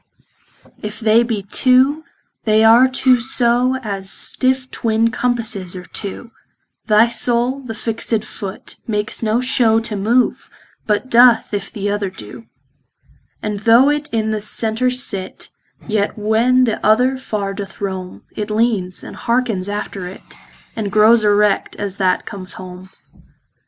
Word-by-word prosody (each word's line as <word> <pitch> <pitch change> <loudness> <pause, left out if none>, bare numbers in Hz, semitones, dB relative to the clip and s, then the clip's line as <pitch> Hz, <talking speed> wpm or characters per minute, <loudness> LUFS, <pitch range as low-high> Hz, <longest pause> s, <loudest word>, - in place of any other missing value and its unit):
If 210 0 -6
they 225 +1 +4
be 225 -4 -2
two, 260 +8 +3 0.4
they 215 0 +3
are 230 +3 +7
two 260 -1 +2
so 245 +1 +1
As 195 -3 -4
stiffe 260 +3 0
twin 225 0 0
compasses 225 -7 -2
are 180 0 -8
two, 220 +5 -7 0.6
Thy 215 +1 +5
soule 240 +2 0
the 245 -5 -8
fixt 225 -1 -1
foot, 195 -3 -8
makes 210 -1 -2
no 225 +1 +1
show 240 -3 +2
To 225 -1 -5
move, 230 +5 0 0.4
but 215 +4 -1
doth, 240 -2 +5
if 200 -1 -4
th' 205 -3 -6
other 205 -1 -1
doe. 195 +4 -11 1.0
And 210 -1 -3
though 230 +6 +5
it 295 0 -3
in 220 -1 -1
the 215 -1 -2
center 225 +3 -1
sit, 235 -7 -3 0.4
Yet 210 -2 -1
when 225 +4 +2
the 230 -3 -1
other 250 +5 +3
far 210 -6 -4
doth 200 -1 -8
rome, 190 -2 -5
It 210 0 -4
leanes, 210 -5 -1
andhearkens 230 -6 -2
after 200 -2 -5
it, 185 - -11 0.5
And 210 -3 -3
growes 215 +2 +5
erect, 210 -1 +2
as 200 -1 -4
that 185 -2 +1
comes 185 -2 -8
home. 185 0 -10
220 Hz, 140 wpm, -18 LUFS, 205-240 Hz, 1.0 s, are